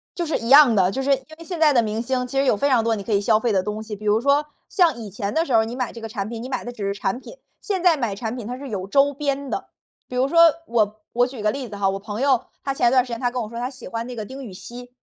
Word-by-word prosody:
就 345 - -2
是 320 - 0
一 230 - -6
样 280 -4 +8
的， 190 -3 +3
就 265 +6 -3
是 280 - +1
因 265 -1 -2
为 335 - -11
现 345 -1 -5
在 300 -3 +5
的 240 - +5
明 220 +1 -2
星， 250 +1 -1
其 270 +2 -2
实 275 - +2
有 235 - +3
非 280 +7 +1
常 245 -3 +4
多 225 0 +1
你 200 - -6
可 220 - -5
以 200 - +4
消 215 +1 +3
费 235 -1 0
的 190 - +2
东 210 +2 -4
西。 215 -1 -6
比 210 - -10
如 210 +2 +3
说， 280 +2 +3 0.2
像 340 -8 +3
以 220 -3 -7
前 200 +1 -4
的 325 +1 +1
时 260 - -3
候 220 -1 +5
你 235 - -6
买 250 -2 -2
这 230 - -10
个 225 - -6
产 205 -1 -4
品， 230 -1 -6
你 250 - -6
买 255 -2 -3
的 245 - -6
只 220 -4 -7
是 200 0 -2
产 195 +5 -2
品， - - -12 0.2
现 385 -4 -2
在 345 -4 +5
买 230 -7 -2
产 220 +2 -4
品 235 -4 -6
它 250 +1 -5
是 275 -1 -8
有 195 -2 -4
周 280 +5 +3
边 280 -1 -2
的。 - - -4 0.4
比 250 - -7
如 255 - +3
说 335 - +3 0.3
我 215 -2 0
我 245 +1 +2
举 250 -4 -8
个 210 0 +2
例 270 -3 -5
子 205 - -8
哈， 200 -1 +1
我 195 0 -2
朋 210 +4 -6
友， 265 -3 +2 0.2
她 275 - -1
前 240 - +3
段 255 0 +4
时 250 - -10
间 230 - -3
她 245 -2 +1
跟 245 0 -3
我 215 - -7
说 235 0 -6
她 250 +1 -2
喜 265 - -11
欢 230 -1 -4
那 250 - -7
个 215 - -5
丁 265 +6 -9
宇 200 - -9
希。 245 +6 -10
240 Hz, 365 characters per minute, -22 LUFS, 215-270 Hz, 0.4 s, 样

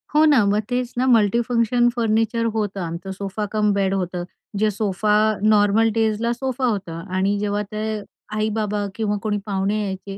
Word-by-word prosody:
हो 305 - +6
ना. 285 -8 +5
मग 205 +1 +2
तेच 245 0 -2
ना 255 - +2
मल्टीफंक्शन 235 +1 +3
फर्निचर 225 0 +1
होतं 205 -3 -2
आमचं, 170 +3 -5
सोफा 200 +2 -4
कम 210 -1 +2
बेड 195 -1 +1
होतं. 180 -2 -2 0.3
जे 215 +1 +2
सोफा 210 0 0 0.3
नॉर्मल 215 +1 +4
डेजला 225 +1 +1
सोफा 260 +1 -2
होता 195 -8 -2 0.2
आणि 195 +2 +1
जेव्हा 205 0 -1
ते 215 +1 -3
अ, - - -9 0.3
आई-बाबा 210 -1 -1
किंवा 210 -2 -1
कोणी 210 -1 0
पाहुणे 200 +1 -1
यायचे, 195 0 -5
210 Hz, 165 wpm, -22 LUFS, 200-225 Hz, 0.3 s, हो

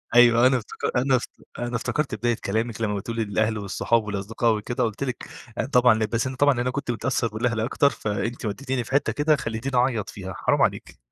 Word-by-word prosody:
أيوَه، 120 0 +7
أنا 130 0 +4
افتك 115 +1 -4
أنا 130 +1 +3
افت 125 - -4 0.3
أنا 120 0 -2
افتكرت 140 +5 -1
بداية 120 -1 0
كلامِك 110 +2 -1
لمّا 105 -2 0
بتقولي 115 +3 -3
للأهل 110 +1 0
والصحاب 105 +3 0
والأصدقاء 105 +3 0
وكده 105 +3 -2
قُلت 110 +3 -2
لِك 125 -2 -4 0.3
أنا - - 0
طبعًا 125 -3 +5
ل 110 0 0
بس 115 +2 -1
أنا 130 0 -4
طبعًا 140 -2 +3
أنا 125 +1 0
كنت 135 -1 -4
متأثّر 120 0 0
بالأهل 110 +1 -1
أكتر 135 +5 +2
فأنتِ 110 +2 -3
وديتيني 130 +3 -2
في 115 - -11
حتّة 135 -4 +2
كده 150 +5 +2
خلّيتيني 125 +1 -3
اعيط 120 -4 +1
فيها 95 -2 -7
حرام - - +2
عليكِ.. - - -1
120 Hz, 205 wpm, -24 LUFS, 110-130 Hz, 0.3 s, أيوَه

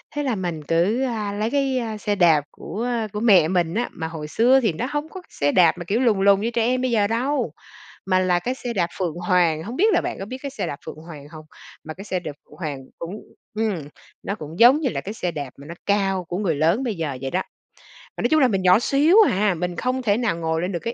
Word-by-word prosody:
Thế 290 - -1
là 255 -4 0
mình 175 -5 -4
cứ, 175 - +1
a, 220 -5 -2
lấy 215 +3 -2
cái 270 -2 +1 0.2
xe 205 0 -1
đạp 165 -6 +4
của, 215 +7 -6
a, 235 -3 -1
của 210 - -3
mẹ 195 -8 +5
mình 175 -2 0
á, 240 +2 -1
mà 160 - -5
hồi 160 -2 -7
xưa 245 +11 +4
thì 220 -8 +1
nó 230 - -3
hông 295 +1 -3
có 375 - -9
xe 145 0 0
đạp 180 -2 +4
mà 175 - -7
kiểu 205 +7 0
lùn 230 -6 +2
lùn 200 0 +4
như 230 +2 -1
trẻ 235 - 0
em 255 +1 +1
bây 255 -1 0
giờ 210 -3 +2
đâu. 240 - -1 0.5
Mà 185 -1 +2
là 180 -1 +2
cái 245 +8 -2
xe 245 -2 -5
đạp 180 -6 +1
Phượng 170 -4 -2
Hoàng, 175 -3 +1
hông 230 +7 -6
biết 415 +8 +3
là 345 - +3
bạn - - -4
có 195 - -5
biết 255 +5 -6
cái 280 - -3
xe 275 - -4
đạp 140 - -5
Phượng - - -7
Hoàng 155 -2 -11
hông? 155 -1 -11 0.4
Mà 155 - -7
cái 190 - -10
xe 190 -3 -2
đạp 175 - -6
Phượng - - -19
Hoàng 150 -5 -4 0.2
cũng, 170 +4 -6 0.4
ừm, 220 -2 0 0.5
nó 200 - -3
cũng 160 -1 -9
giống 250 +5 +7
như 275 - +1
là - - -3
cái 205 - -6
xe 180 -5 -3
đạp 145 -4 -5
mà 140 +1 -12
nó 170 - -8
cao 195 -2 +1
của 175 +2 -4
người 185 -6 0
lớn 165 - +2
bây 235 -5 -2
giờ 155 -6 -3
vậy 135 -1 -4
đó. 185 - 0 0.8
Mà - - -3
nói - - +2
chung 315 - +4
là 260 - +6
mình 195 -4 0
nhỏ 185 +2 +5
xíu 290 - +3
hà, 200 +1 +2
mình 175 +1 -3
không 255 +7 -1
thể 210 -4 +1
nào 230 -8 0
ngồi 160 -1 -1
lên 180 +2 -2
được 175 - -3
cái 230 +7 -4
195 Hz, 270 wpm, -22 LUFS, 170-235 Hz, 0.8 s, giống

